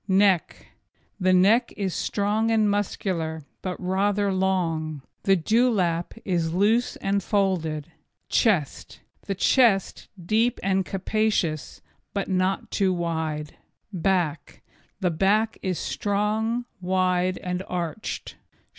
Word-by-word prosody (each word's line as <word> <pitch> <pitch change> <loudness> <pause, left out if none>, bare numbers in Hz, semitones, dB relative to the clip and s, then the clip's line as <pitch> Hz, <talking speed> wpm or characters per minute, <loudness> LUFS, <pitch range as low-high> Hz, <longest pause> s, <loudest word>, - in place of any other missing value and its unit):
NECK 190 -2 +2 0.5
The 185 -1 +3
neck 195 +7 +4
is 195 -3 -1
strong 210 +2 0
and 220 -2 +3
muscular, 180 -6 -2 0.2
but 185 -1 -4
rather 200 +2 +1
long. 165 -6 -1 0.2
The 195 - +5
dewlap 190 -3 +1
is 170 -3 0
loose 220 +6 +2
and 200 +1 -1
folded. 175 -7 -1 0.4
CHEST 190 - 0 0.3
The 195 - -1
chest, 200 -1 +2
deep 220 +7 +1
and 190 0 +2
capacious, 195 -6 -1 0.3
but 200 - -1
not 185 0 0
too 195 -2 +2
wide. 160 -4 -3 0.4
BACK 175 -5 -1 0.4
The 180 -2 +2
back 205 +6 +1
is 185 -3 -1
strong, 215 +4 -1 0.2
wide 185 0 +1
and 180 0 -3
arched. 175 +3 -4
190 Hz, 110 wpm, -25 LUFS, 175-205 Hz, 0.5 s, The